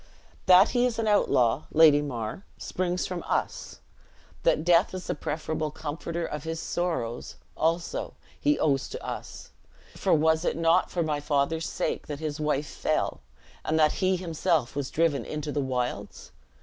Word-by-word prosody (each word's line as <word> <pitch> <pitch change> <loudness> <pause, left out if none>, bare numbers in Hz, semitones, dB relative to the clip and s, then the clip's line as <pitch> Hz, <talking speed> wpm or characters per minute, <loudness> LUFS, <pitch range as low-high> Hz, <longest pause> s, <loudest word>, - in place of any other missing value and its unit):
"That 185 +3 +8
he 245 0 +2
is 235 - -3
an 225 -1 -1
outlaw, 135 - +3
Lady 155 -2 +6
Mar, 120 - -4
springs 180 0 -2
from 180 -2 -4
us. - - -2 0.6
That 155 - +2
death 175 +2 +4
is 185 - -6
the - - -1
preferable 155 +1 -3
comforter 160 +3 -4
of 150 -2 -5
his 160 0 -4
sorrows, 160 -12 -3 0.2
also, 165 +2 -1 0.2
he 295 0 +2
owes 140 -3 +1
to - - -7
us; - - -7 0.4
for - - +2
was 160 +1 +3
it - - 0
not 165 +2 +3
for 175 - -1
my 150 -2 -1
father's 145 +2 0
sake - - -2
that 145 - -4
his 155 -1 -4
wife 150 -1 0
fell, - - -1 0.4
and 160 - 0
that 155 -1 +5
he 185 0 +3
himself 165 -6 0
was 140 -2 -2
driven 160 -3 +1
into 150 -1 -4
the 145 - -1
wilds? 125 -2 -3
160 Hz, 160 wpm, -27 LUFS, 145-175 Hz, 0.6 s, That